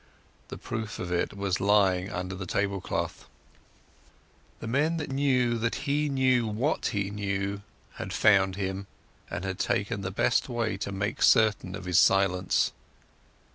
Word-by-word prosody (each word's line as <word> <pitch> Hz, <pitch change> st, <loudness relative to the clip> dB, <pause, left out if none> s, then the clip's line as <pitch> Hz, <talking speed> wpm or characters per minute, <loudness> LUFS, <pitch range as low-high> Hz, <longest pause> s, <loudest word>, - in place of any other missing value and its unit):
The -, -, -8 dB
proof 110 Hz, -1 st, -5 dB
of 90 Hz, -1 st, -5 dB
it 90 Hz, +3 st, -1 dB
was 100 Hz, -2 st, -1 dB
lying 100 Hz, -2 st, +3 dB
under 90 Hz, +1 st, -4 dB
the 95 Hz, -1 st, -6 dB
table 100 Hz, +1 st, -1 dB
cloth. -, -, -4 dB, 1.3 s
The -, -, -7 dB
men 145 Hz, +8 st, +1 dB
who 150 Hz, -, -3 dB
knew 130 Hz, -3 st, +1 dB
that 115 Hz, +1 st, -1 dB
he 145 Hz, +1 st, +1 dB
knew 130 Hz, -4 st, +2 dB
what 115 Hz, +9 st, -1 dB
he 100 Hz, -4 st, -2 dB
knew 100 Hz, -1 st, -2 dB, 0.4 s
had -, -, -5 dB
found 95 Hz, -2 st, +4 dB
him, 95 Hz, 0 st, -4 dB, 0.4 s
and -, -, -4 dB
had 95 Hz, -1 st, -4 dB
taken 105 Hz, -2 st, -1 dB
the 95 Hz, -, -3 dB
best 110 Hz, +7 st, +1 dB
way 115 Hz, -3 st, -1 dB
to 100 Hz, -, -4 dB
make 100 Hz, +3 st, -3 dB
certain 105 Hz, -4 st, +3 dB
of 95 Hz, -2 st, -8 dB
his 90 Hz, -2 st, +3 dB
silence. 95 Hz, -1 st, +3 dB
100 Hz, 155 wpm, -28 LUFS, 95-120 Hz, 1.3 s, found